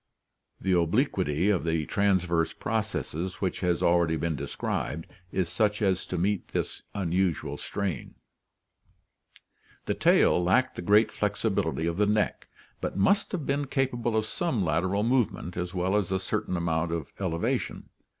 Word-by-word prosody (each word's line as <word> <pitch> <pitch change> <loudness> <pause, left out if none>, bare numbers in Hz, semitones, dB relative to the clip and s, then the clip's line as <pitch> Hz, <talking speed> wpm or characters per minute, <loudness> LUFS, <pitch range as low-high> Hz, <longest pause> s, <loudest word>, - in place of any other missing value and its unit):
The 95 - -1
obliquity 90 - +2
of 95 - +1
the 80 -2 0
transverse 90 -1 +1
processes 100 -5 -2
which 95 -2 -1
has 90 -2 0
already 85 -1 +3
been 80 0 -1
described 70 +3 -3 0.3
is 95 -2 0
such 105 +2 +1
as 95 -3 +1
to 90 - -3
meet 100 +2 0
this - - -3
unusual 90 -3 0
strain. 100 -9 -4 1.7
The - - 0
tail 90 - +4
lacked 125 +9 +2
the - - -5
great 105 +5 +4
flexibility 80 - 0
of 85 0 -1
the 105 0 +3
neck, 105 0 0 0.3
but - - -3
must 195 - +3
have 170 -7 -3
been 140 0 0
capable 120 -4 0
of 110 - +1
some 120 - -1
lateral 90 +6 +1
movement 115 -7 0
as 90 +1 -4
well 90 +2 +1
as 100 -3 0
a 95 - +2
certain 90 -1 -2
amount 85 0 0
of 85 -4 -4
elevation. 85 -4 -2
95 Hz, 150 wpm, -28 LUFS, 85-105 Hz, 1.7 s, tail